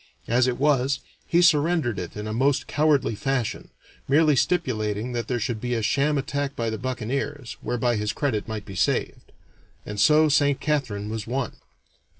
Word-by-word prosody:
As 125 +2 +3
it 125 -1 -1
was, 135 -1 +2 0.3
he 175 +1 +3
surrendered 155 - +3
it 90 +3 -7
in 105 - -5
a 110 - -3
most 135 +4 +1
cowardly 145 -5 +2
fashion, 130 +1 -2 0.4
merely 150 +1 +4
stipulating 120 - 0
that 120 -1 -3
there 125 -1 -1
should 115 -1 -3
be 125 0 -1
a 115 - -1
sham 140 +6 +2
attack 140 +1 -2
by 115 -1 -2
the 110 - -4
buccaneers, 130 +2 -3
whereby 120 -1 0
his 105 0 -1
credit 115 -5 -2
might 110 -2 -5
be 100 - -9
saved. 95 - -1 0.5
And 105 0 -5
so 155 +8 +5
Saint 145 -2 +3
Catharine 115 -9 -2
was 110 -1 -4
won. 125 +1 -2
125 Hz, 170 wpm, -25 LUFS, 110-145 Hz, 0.5 s, so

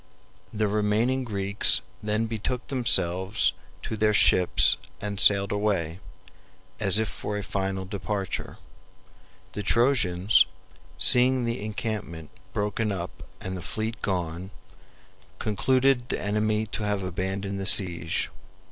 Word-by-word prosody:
The 105 0 -1
remaining 105 +5 0
Greeks 100 -3 +2 0.2
then 105 +1 -1
betook 115 +3 -4
themselves 105 -5 +1 0.3
to 110 - -4
their 105 0 +1
ships 90 -3 +5 0.2
and 100 -1 -5
sailed 100 -1 +6
away, 95 -5 -1 0.8
as 100 -1 +3
if 110 0 +2
for 105 +1 -5
a 105 - -4
final 95 -1 -3
departure. 100 0 -4 1.0
The 105 - -4
Trojans, 110 -4 +3 0.5
seeing 125 0 +5
the 115 -3 -3
encampment 100 -7 -5 0.2
broken 105 +1 -2
up 90 -2 -4 0.3
and 95 0 -6
the 90 - -6
fleet 110 +6 -4
gone, 90 -1 -3 0.9
concluded 130 +3 +1
the - - -1
enemy 105 +1 -1
to 110 - -5
have 105 -2 -1
abandoned 95 +2 -4
the 95 - +2
siege. 85 -5 +3
105 Hz, 120 wpm, -25 LUFS, 95-110 Hz, 1.0 s, sailed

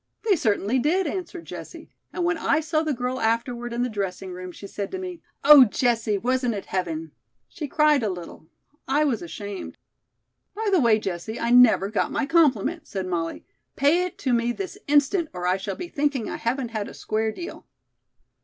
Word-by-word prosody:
"They 405 - +5
certainly 220 - +1
did," 350 +9 +2
answered 350 +1 -5
Jessie, - - -9 0.2
"and 350 - -2
when 345 0 +2
I 305 0 +2
saw 310 0 0
the 315 -1 -1
girl 250 0 -2
afterward 235 +2 -1
in 240 +1 -1
the - - +1
dressing 195 -4 -4
room, 180 0 -7
she 200 - -11
said 200 0 -5
to - - -4
me, 365 -2 -6 0.2
'Oh, 290 -1 +10
Jessie, 225 -2 +1
wasn't 250 +1 0
it 200 - -5
heaven?' 165 -4 -3 0.4
She 300 - -6
cried 300 -1 +3
a 215 - 0
little. 175 -3 -8 0.4
I 285 +3 +2
was 260 -7 0
ashamed." 195 +3 -7 0.8
"By 435 0 -1
the 375 - +4
way, 230 -3 +5
Jessie, 200 +2 -4
I 235 - 0
never 235 -5 +6
got 215 - 0
my - - 0
compliment," 305 - +2
said 190 -2 -4
Molly. 170 -2 -3 0.3
"Pay 300 +6 +3
it - - -13
to 260 -3 0
me 235 0 +2
this 375 +9 -5
instant, 295 +4 +3
or 180 -1 -5
I 180 +1 +2
shall 195 0 -4
be 355 - -6
thinking 285 -7 -1
I - - -4
haven't 245 +1 -2
had 215 -3 -3
a - - -10
'square 220 0 -1
deal.'" 345 +9 -8
240 Hz, 195 wpm, -24 LUFS, 200-300 Hz, 0.8 s, Oh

